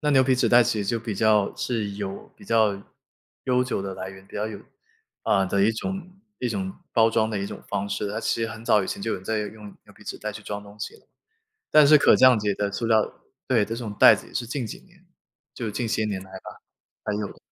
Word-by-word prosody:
那 150 Hz, -, +1 dB
牛 135 Hz, -2 st, +6 dB
皮 130 Hz, 0 st, +3 dB
纸 125 Hz, -, +2 dB
袋 120 Hz, 0 st, +7 dB
其 110 Hz, -2 st, 0 dB
实 -, -, -5 dB
就 115 Hz, -, +1 dB
比 110 Hz, -2 st, -4 dB
较 105 Hz, -1 st, +3 dB
是 110 Hz, -4 st, -2 dB
有 100 Hz, -1 st, -6 dB
比 -, -, -15 dB
较 110 Hz, -3 st, +2 dB, 0.6 s
悠 125 Hz, -1 st, +2 dB
久 125 Hz, -, -2 dB
的 95 Hz, -1 st, -5 dB
来 95 Hz, +1 st, -6 dB
源， 95 Hz, 0 st, -14 dB
比 -, -, -17 dB
较 105 Hz, -, -1 dB
有 105 Hz, -2 st, -7 dB, 0.6 s
呃， 95 Hz, -1 st, +3 dB
的 100 Hz, +1 st, +1 dB
一 110 Hz, -, +4 dB
种 190 Hz, +10 st, -5 dB, 0.3 s
一 125 Hz, -, -1 dB
种 95 Hz, -4 st, -3 dB, 0.2 s
包 115 Hz, -1 st, +5 dB
装 110 Hz, 0 st, +1 dB
的 105 Hz, -, -2 dB
一 100 Hz, -, -2 dB
种 -, -, -8 dB
方 100 Hz, 0 st, -2 dB
式， 105 Hz, -, -2 dB
它 110 Hz, +2 st, -3 dB
其 115 Hz, -, 0 dB
实 115 Hz, -, -1 dB
很 110 Hz, +1 st, -9 dB
早 105 Hz, -3 st, +4 dB
以 -, -, -4 dB
前 -, -, -4 dB
就 115 Hz, -, -2 dB
有 -, -, -1 dB
人 95 Hz, -, -12 dB
在 110 Hz, +1 st, -1 dB
用 105 Hz, 0 st, -6 dB, 0.2 s
牛 -, -, -17 dB
皮 -, -, -17 dB
纸 -, -, -6 dB
袋 -, -, -4 dB
去 -, -, -9 dB
装 105 Hz, 0 st, -5 dB
东 105 Hz, +1 st, -15 dB
西 -, -, -5 dB
了。 -, -, -25 dB, 0.6 s
但 150 Hz, -2 st, +7 dB
是 150 Hz, 0 st, +8 dB
可 -, -, +6 dB
降 130 Hz, -3 st, +6 dB
解 105 Hz, -1 st, 0 dB
的 100 Hz, 0 st, -1 dB
塑 115 Hz, +3 st, -2 dB
料 110 Hz, -2 st, +2 dB, 0.4 s
对， 115 Hz, -5 st, +3 dB
这 115 Hz, +2 st, -4 dB
种 115 Hz, -3 st, -5 dB
袋 -, -, +8 dB
子 -, -, -9 dB
也 -, -, -18 dB
是 120 Hz, -, -2 dB
近 130 Hz, 0 st, -3 dB
几 -, -, -8 dB
年， 180 Hz, 0 st, -24 dB, 0.5 s
就 115 Hz, -4 st, -4 dB
近 115 Hz, +3 st, -2 dB
些 110 Hz, -1 st, 0 dB
年 100 Hz, -3 st, -2 dB
来 95 Hz, -, -15 dB
吧， 95 Hz, -, -10 dB, 0.4 s
才 105 Hz, -, -1 dB
有 105 Hz, -, -2 dB
的。 -, -, -14 dB
110 Hz, 285 characters per minute, -25 LUFS, 100-120 Hz, 0.6 s, 是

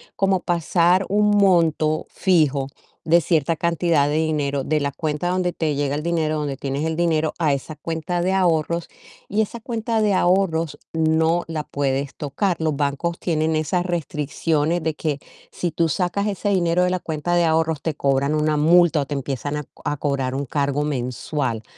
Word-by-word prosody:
como 195 Hz, -1 st, +2 dB
pasar 175 Hz, +2 st, +2 dB
un 210 Hz, +1 st, +3 dB
monto 165 Hz, -5 st, +2 dB
fijo 150 Hz, -7 st, +2 dB, 0.4 s
de 170 Hz, +1 st, +5 dB
cierta 160 Hz, -1 st, +1 dB
cantidad 170 Hz, -3 st, +1 dB
de 150 Hz, -, 0 dB
dinero 145 Hz, -3 st, 0 dB
de 155 Hz, +2 st, 0 dB
la 140 Hz, -, -1 dB
cuenta 155 Hz, +3 st, -2 dB
donde 180 Hz, -1 st, 0 dB
te 155 Hz, -3 st, -1 dB
llega 140 Hz, 0 st, -1 dB
el 150 Hz, -, -3 dB
dinero, 160 Hz, -2 st, 0 dB
donde 145 Hz, -3 st, -3 dB
tienes 140 Hz, +2 st, -3 dB
el 160 Hz, 0 st, -1 dB
dinero, 160 Hz, -2 st, +1 dB
a 150 Hz, -4 st, +2 dB
esa 140 Hz, +3 st, -5 dB
cuenta 165 Hz, +2 st, -3 dB
de 185 Hz, +2 st, +1 dB
ahorros 170 Hz, -2 st, +1 dB, 0.4 s
y 210 Hz, +2 st, +1 dB
esa 225 Hz, +2 st, -3 dB
cuenta 225 Hz, -1 st, -1 dB
de 210 Hz, -2 st, +2 dB
ahorros 170 Hz, -5 st, +1 dB, 0.2 s
no 160 Hz, +1 st, +2 dB
la 160 Hz, -2 st, -3 dB
puedes 140 Hz, -1 st, -2 dB
tocar. 165 Hz, +6 st, -1 dB
Los 155 Hz, -2 st, 0 dB
bancos 145 Hz, +4 st, -1 dB
tienen 160 Hz, -2 st, 0 dB
esas 165 Hz, +3 st, 0 dB
restricciones 160 Hz, 0 st, -1 dB
de 160 Hz, -1 st, 0 dB
que 150 Hz, -3 st, -2 dB, 0.3 s
si 175 Hz, -2 st, -3 dB
tú 165 Hz, 0 st, +1 dB
sacas 190 Hz, +5 st, -1 dB
ese 205 Hz, 0 st, -2 dB
dinero 180 Hz, -2 st, +2 dB
de 180 Hz, -, +1 dB
la 185 Hz, -, 0 dB
cuenta 160 Hz, +2 st, -3 dB
de 175 Hz, -1 st, +3 dB
ahorros, 160 Hz, -2 st, +1 dB
te 160 Hz, -, -2 dB
cobran 140 Hz, +2 st, +1 dB
una 150 Hz, 0 st, +1 dB
multa 165 Hz, 0 st, +4 dB
o -, -, -2 dB
te 145 Hz, -, -3 dB
empiezan 140 Hz, +1 st, -3 dB
a 150 Hz, -, -4 dB
co -, -, -22 dB
a 145 Hz, -, -1 dB
cobrar 135 Hz, -2 st, -1 dB
un 140 Hz, +1 st, -2 dB
cargo 140 Hz, +1 st, -1 dB
mensual. 125 Hz, -3 st, -2 dB
160 Hz, 185 wpm, -22 LUFS, 145-175 Hz, 0.4 s, de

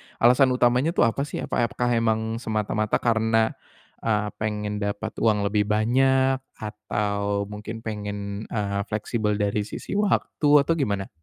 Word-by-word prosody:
alasan 125 Hz, +3 st, +5 dB
utamanya 125 Hz, +7 st, +2 dB
tuh -, -, +4 dB
apa 115 Hz, +4 st, +1 dB
sih? -, -, -5 dB
Apakah 120 Hz, +1 st, 0 dB
emang 110 Hz, -1 st, 0 dB
semata-mata 110 Hz, -2 st, -1 dB
karena, 110 Hz, -1 st, +2 dB, 0.5 s
eee, 105 Hz, -2 st, 0 dB
pengen 105 Hz, -1 st, -2 dB
dapat 105 Hz, +2 st, -3 dB
uang 105 Hz, -2 st, +2 dB
lebih 105 Hz, 0 st, +1 dB
banyak 130 Hz, +5 st, +3 dB, 0.2 s
atau 105 Hz, -1 st, -2 dB
mungkin 110 Hz, +2 st, -7 dB
pengen, 105 Hz, -1 st, -5 dB
eee, 100 Hz, -2 st, -2 dB
fleksibel 105 Hz, 0 st, -1 dB
dari 105 Hz, 0 st, -1 dB
sisi -, -, -8 dB
waktu 200 Hz, -7 st, +1 dB
atau 165 Hz, -, -1 dB
gimana? 105 Hz, -11 st, -1 dB
110 Hz, 135 wpm, -25 LUFS, 105-120 Hz, 0.5 s, alasan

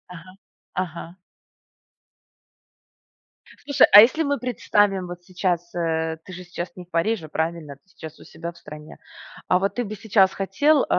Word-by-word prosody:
Ага 185 Hz, +3 st, -14 dB, 0.4 s
ага. 175 Hz, -1 st, -5 dB, 2.5 s
Слушай, 285 Hz, -2 st, +5 dB
а 205 Hz, -, +12 dB
если 255 Hz, +8 st, +3 dB
мы 285 Hz, -1 st, 0 dB
представим 205 Hz, -6 st, 0 dB
вот 175 Hz, 0 st, -9 dB
сейчас, 175 Hz, -1 st, -2 dB
э, 160 Hz, -1 st, -2 dB
ты 185 Hz, -, -11 dB
же 180 Hz, 0 st, -8 dB
сейчас 175 Hz, 0 st, -6 dB
не 180 Hz, -2 st, -10 dB
в 175 Hz, -, -43 dB
Париже, 170 Hz, +1 st, -1 dB
правильно? 160 Hz, -1 st, -4 dB
Ты 140 Hz, -, -32 dB
сейчас 160 Hz, -3 st, -11 dB
у -, -, -13 dB
себя 170 Hz, -, -8 dB
в 170 Hz, -, -21 dB
стране. 150 Hz, -1 st, -12 dB, 0.5 s
А 180 Hz, -, +4 dB
вот 195 Hz, +1 st, -2 dB
ты 245 Hz, -, -1 dB
бы 215 Hz, -1 st, -6 dB
сейчас 200 Hz, -3 st, +3 dB
хотел, 275 Hz, +10 st, +2 dB
э, -, -, -2 dB
180 Hz, 165 wpm, -23 LUFS, 170-205 Hz, 2.5 s, а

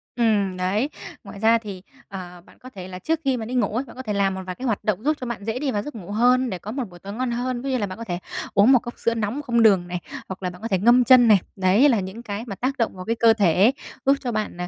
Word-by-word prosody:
Ừm, 210 Hz, -6 st, +1 dB
đấy. 200 Hz, +9 st, 0 dB, 0.3 s
Ngoài 200 Hz, -, -10 dB
ra 225 Hz, +2 st, +4 dB
thì, 205 Hz, -5 st, -8 dB, 0.3 s
ờ, 180 Hz, -2 st, -9 dB
bạn -, -, -20 dB
có 255 Hz, -, -11 dB
thể 190 Hz, -7 st, -9 dB
là 185 Hz, -1 st, -8 dB
trước 320 Hz, +9 st, -1 dB
khi 265 Hz, -2 st, +1 dB
mà 225 Hz, -, -5 dB
đi 240 Hz, -, -6 dB
ngủ 225 Hz, -4 st, 0 dB
ấy, 250 Hz, -, 0 dB
bạn -, -, -14 dB
có 260 Hz, -, -7 dB
thể 215 Hz, -4 st, -3 dB
làm 200 Hz, -1 st, +1 dB
một 190 Hz, -, -5 dB
vài 185 Hz, -1 st, -5 dB
cái 255 Hz, -, -7 dB
hoạt 225 Hz, -5 st, -1 dB
động 215 Hz, 0 st, -1 dB
giúp 305 Hz, +2 st, +1 dB
cho -, -, -3 dB
bạn 235 Hz, -4 st, -5 dB
dễ 225 Hz, +3 st, -2 dB
đi 275 Hz, -1 st, -1 dB
vào 205 Hz, -3 st, -1 dB
giấc 295 Hz, -, -8 dB
ngủ 200 Hz, -3 st, -8 dB
hơn 250 Hz, +4 st, +3 dB
để 185 Hz, -4 st, -4 dB
có 210 Hz, -, -7 dB
một 260 Hz, +2 st, -3 dB
buổi 175 Hz, -1 st, -14 dB
tối 200 Hz, +3 st, -8 dB
ngon 250 Hz, +2 st, -2 dB
hơn. 245 Hz, +1 st, -2 dB
Ví 275 Hz, -, -4 dB
dụ -, -, 0 dB
như -, -, +2 dB
là 210 Hz, -, -1 dB
bạn 185 Hz, -, -8 dB
có 230 Hz, -, -6 dB
thể 175 Hz, -5 st, -4 dB, 0.3 s
uống 205 Hz, +6 st, +5 dB
1 255 Hz, -, +6 dB
cốc 240 Hz, +1 st, -8 dB
sữa 230 Hz, -, +1 dB
nóng 225 Hz, +5 st, -2 dB
không 235 Hz, -5 st, +2 dB
đường 195 Hz, -5 st, +4 dB
này, 180 Hz, 0 st, -4 dB, 0.3 s
hoặc 190 Hz, 0 st, -8 dB
là 180 Hz, -, -1 dB
bạn 180 Hz, 0 st, -12 dB
có 225 Hz, -, -3 dB
thể 195 Hz, -, +1 dB
ngâm 240 Hz, +5 st, +5 dB
chân 245 Hz, 0 st, +7 dB
này. 210 Hz, -3 st, +6 dB, 0.2 s
Đấy 195 Hz, +9 st, +4 dB
là 235 Hz, -5 st, +3 dB
những 190 Hz, +5 st, -7 dB
cái 210 Hz, 0 st, -5 dB
mà 205 Hz, -5 st, -6 dB
tác 260 Hz, +6 st, -2 dB
động 230 Hz, -4 st, -1 dB
vào 185 Hz, 0 st, -8 dB
cái 230 Hz, -, 0 dB
cơ 230 Hz, -1 st, +5 dB
thể, 200 Hz, +1 st, +4 dB, 0.3 s
giúp 275 Hz, +1 st, +5 dB
cho 250 Hz, -, -3 dB
bạn, 215 Hz, -5 st, -3 dB
à, 180 Hz, -, -3 dB
220 Hz, 325 wpm, -23 LUFS, 195-245 Hz, 0.3 s, chân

